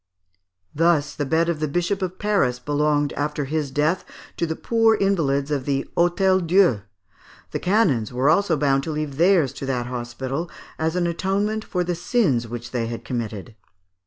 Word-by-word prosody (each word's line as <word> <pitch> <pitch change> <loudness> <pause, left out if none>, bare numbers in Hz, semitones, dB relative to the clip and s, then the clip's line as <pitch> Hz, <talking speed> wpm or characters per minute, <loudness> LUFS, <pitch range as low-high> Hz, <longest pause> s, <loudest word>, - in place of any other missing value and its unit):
Thus 160 -2 +2
the 145 - -3
bed 160 +3 +2
of 170 -3 -1
the 155 - 0
Bishop 175 +6 -1
of 185 0 -3
Paris 200 -13 +1
belonged, 145 +2 0
after 150 0 -2
his 150 0 -2
death, 150 +6 0 0.3
to 170 - 0
the 160 - -2
poor 225 +2 +3
invalids 150 -9 +1
of 140 -3 -1
the 140 -1 0
Hôtel 185 +1 +2
Dieu. 175 - +4 0.7
The - - -2
canons 180 - +2
were 125 +3 0
also 165 +1 +3
bound 135 -1 +2
to 160 - -3
leave 150 -3 -4
theirs 170 -5 +3
to 135 - -6
that 125 -3 -1
hospital, 125 +6 -4 0.3
as 160 +1 0
an 180 -1 +1
atonement 195 +5 -1
for 180 -4 -2
the 175 0 -1
sins 170 - +1
which 120 +1 -7
they 115 -2 -1
had 115 0 -6
committed. 115 -3 -5
155 Hz, 175 wpm, -23 LUFS, 135-180 Hz, 0.7 s, Dieu